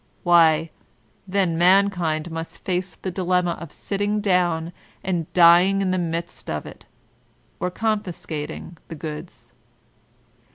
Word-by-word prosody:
Why, 165 -2 +4 0.6
then 185 -4 0
man 195 +3 +5
kind 165 -3 -2
must 165 0 -7
face 180 -2 -2
the 185 - -5
dilemma 180 -1 +1
of 170 - -8
sitting 205 +1 -2
down 175 -4 +1 0.3
and 175 -4 -2
dying 180 +3 +6
in 190 -2 0
the 185 - 0
midst 170 0 -4
of 75 -1 -3
it, - - -12 0.7
or 180 - -1
confiscating 180 -6 -4
the 165 - -7
goods. 155 +2 -8
175 Hz, 125 wpm, -23 LUFS, 165-185 Hz, 0.7 s, dying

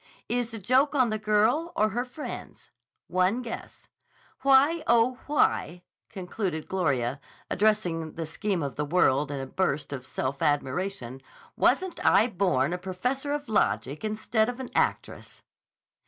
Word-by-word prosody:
Is 240 -1 -1
the 230 - -7
joke 260 +8 +2
on 255 -5 +3
the 215 - -1
girl 220 +10 +2
or 215 +1 +3
her 240 +3 -2
friends? 260 +4 -8 0.3
One 185 +7 +1
guess. 230 - -8 0.5
Why, 280 +4 +4
oh, 235 +2 +3
why," 180 - +1 0.3
concluded 185 -4 -4
Gloria 140 -8 0 0.3
addressing 180 -6 +1
the 165 - -4
Scheme 180 +2 -2
of 140 - -5
the 150 - 0
World 145 -3 +2
in 140 -1 -4
a 135 - -4
burst 145 -1 -1
of 130 -2 -5
self 135 +1 -3
admiration, 145 -2 -1 0.3
"wasn't 370 -2 +1
I 220 - +5
born 180 - +1
a 180 - -3
professor 250 +10 -2
of 290 -1 -3
logic 130 - 0
instead 220 +1 0
of 245 +1 -6
an 260 - -6
actress?" - - -2
200 Hz, 145 wpm, -27 LUFS, 155-245 Hz, 0.5 s, I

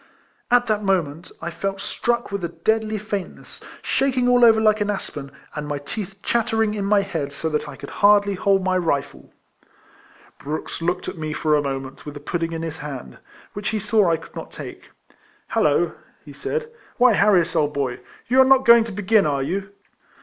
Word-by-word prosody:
At 245 0 +4
that 215 -1 0
moment 175 -4 -1
I 170 - -3
felt 195 +3 -3
struck 235 +2 -2
with 200 -2 -3
a 170 - -1
deadly 215 +6 0
faintness, 205 -2 -6 0.2
shaking 260 -2 +1
all 245 0 +5
over 225 -2 +7
like 215 -1 +3
an 205 - 0
aspen, 150 -8 -4 0.2
and 150 0 -5
my 145 0 -2
teeth 195 +6 -7
chattering 225 -2 +1
in 205 -2 -2
my 205 0 +4
head 165 -8 -3
so 160 +3 -3
that 150 -1 -2
I - - -8
could - - -10
hardly 205 0 +4
hold 195 0 +2
my 185 0 +1
rifle. 145 -5 -2 1.1
Brooks 155 +3 -5
looked 175 +2 -1
at - - -6
me 155 -1 -3
for 155 0 +1
a 150 - +2
moment, 135 -1 -5
with 150 -1 -8
the - - -6
pudding 165 +3 -3
in 165 0 -4
his 160 -1 -5
hand, 145 -4 -8 0.3
which 205 +1 -3
he 215 - -1
saw 210 -2 +2
I 165 - +2
could 165 - -15
not - - -7
take. - - -9 0.6
"Hallo," - - +2 0.3
he - - -11
said, 465 0 -4 0.3
"why 250 -1 +6
Harris, 190 -5 +3
old 150 0 +1
boy, 130 -3 -2 0.3
you 255 +2 +5
are - - +9
not 265 0 +4
going 235 -1 +8
to 225 - -7
begin, 205 -1 +2
are 140 -2 0
you?" 195 +6 -3
195 Hz, 195 wpm, -22 LUFS, 155-220 Hz, 1.1 s, are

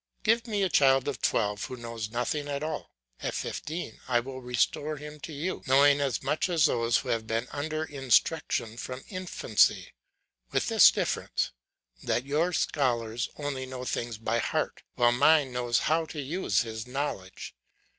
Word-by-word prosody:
Give 230 +2 +2
me 205 -3 0
a - - +3
child 135 -3 +4
of 135 -5 -3
twelve 105 0 0
who 130 - -6
knows 115 -2 -5
nothing 125 +6 -2
at 140 0 -3
all; 155 - -4 0.3
at - - -3
fifteen 155 -8 -5
I 120 -2 +3
will 130 +2 -7
restore 125 +5 0
him 150 +1 -9
to 160 - -8
you 155 +6 -3
knowing 140 +2 +5
as 135 -5 -1
much 150 +6 0
as 165 -4 +4
those 115 -4 +2
who - - -5
have 115 -1 -1
been 115 +2 -1
under 155 +2 -2
instruction 135 -4 +1
from 130 +1 -6
infancy; 185 - +1 0.6
with - - 0
this - - +8
difference, - - -1 0.5
that 125 - -1
your 155 +6 +1
scholars 120 -8 0
only 140 -3 -4
know 130 -1 -6
things 120 -2 -3
by 115 +1 -1
heart, - - -1
while 120 0 +4
mine 140 +2 +4
knows 120 -1 0
how 160 +2 +1
to 155 - -7
use 140 - 0
his 110 0 -5
knowledge. 125 -9 -4
135 Hz, 165 wpm, -28 LUFS, 120-150 Hz, 0.6 s, this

